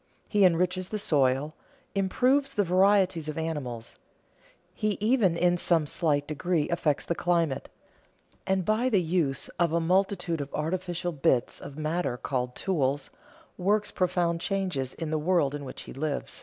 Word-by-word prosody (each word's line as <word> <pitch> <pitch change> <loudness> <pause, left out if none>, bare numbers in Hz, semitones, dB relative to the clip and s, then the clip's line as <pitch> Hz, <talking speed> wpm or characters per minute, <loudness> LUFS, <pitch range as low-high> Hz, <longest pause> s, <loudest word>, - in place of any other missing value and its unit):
He 205 -2 +4
enriches 180 +1 +1
the 215 - -2
soil, 145 -5 +1 0.4
improves 255 +8 +1
the 205 - +3
varieties 185 -3 +3
of 155 - -5
animals, 140 -8 -4 0.8
he 215 -2 -1
even 210 -6 +2
in 175 +1 +3
some 170 -3 +2
slight 145 -2 0
degree 155 +1 -1
affects 155 -4 0
the - - 0
climate, 170 -5 0 0.8
and 190 -2 +1
by 225 +4 +2
the 210 -6 +3
use 160 -6 0
of 170 -2 +3
a 170 - +3
multitude 175 -1 +1
of 140 - -6
artificial 175 +2 -2
bits 135 -5 +1
of 140 - -10
matter 155 -4 -1
called 125 -1 -3
tools, 145 -6 -1 0.5
works 205 +3 +1
profound 175 -2 0
changes 180 -11 -2
in 160 -2 -4
the 155 - 0
world 155 -4 +2
in 145 -1 -5
which 130 - -7
he - - -10
lives. 145 +1 -3
170 Hz, 155 wpm, -28 LUFS, 150-185 Hz, 0.8 s, He